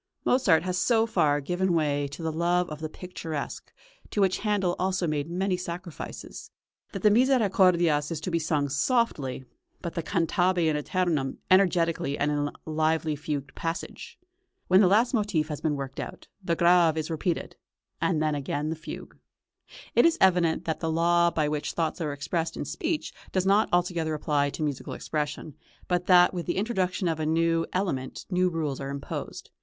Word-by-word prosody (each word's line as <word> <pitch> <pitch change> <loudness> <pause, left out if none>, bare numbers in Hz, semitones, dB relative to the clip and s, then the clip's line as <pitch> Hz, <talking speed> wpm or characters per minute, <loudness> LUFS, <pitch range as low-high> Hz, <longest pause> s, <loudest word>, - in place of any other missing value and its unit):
Mozart 190 -11 +4
has 180 0 -1
so 225 0 +3
far 145 -9 +2
given 180 +4 0
way 145 -3 +1
to 140 +4 -9
the 160 - -1
love 175 +2 +1
of 150 - -6
the 155 0 -4
picturesque, 165 -4 -6 0.4
to - - -3
which 190 -2 +2
Handel 205 -4 0
also 185 -1 0
made 150 -1 -2
many 185 +2 0
sacrifices, 175 -1 -7 0.4
that - - -6
the 210 - +6
"Misericordias" 185 - +3
is 165 - -2
to 180 - -4
be 170 - +1
sung 150 -3 0
softly, 140 - 0 0.3
but 170 - -5
the 170 - -2
"cantabe 175 +3 +1
in 155 -1 +2
æternum" 150 -3 -1
energetically 170 -6 +3
and 145 +1 +1
in 145 - 0
a - - -7
lively 155 0 0
fugued 145 -2 -4
passage. 165 0 -5 0.5
When 185 +2 +6
the 195 - +6
last 225 +7 +3
motif 200 -9 0
has 150 -1 -5
been 155 -2 0
worked 135 -1 -6
out, - - -7 0.2
the 170 -2 0
Grave 170 -2 +4
is 155 +1 -3
repeated, 165 +2 -2 0.5
and 160 -5 +1
then 155 -1 +1
again 145 +1 -2
the - - -2
fugue. 160 +1 -9 0.8
It - - +5
is 335 - +1
evident 175 -3 +3
that 160 - -2
the 160 -1 -1
law 170 +1 +3
by 155 -3 0
which 150 0 -2
thoughts 165 +1 -2
are 150 -2 -1
expressed 160 +4 -3
in - - -3
speech 325 -2 -3 0.2
does 185 -1 0
not 200 +3 +3
altogether 175 -3 +1
apply 145 -2 +1
to 155 - -4
musical 145 -3 -3
expression, 150 0 -4 0.3
but 180 0 0
that 180 -1 +6
with 175 -2 -4
the 175 - -1
introduction 190 -3 0
of 160 -1 -1
a 155 - -1
new 165 +1 +1
element 155 -9 -3
new 180 0 +2
rules 155 -5 -3
are - - -4
{CHURCH 140 - -4
MUSIC.} 140 - -6
(280) - - -2
imposed. - - -11
165 Hz, 185 wpm, -27 LUFS, 150-185 Hz, 0.8 s, the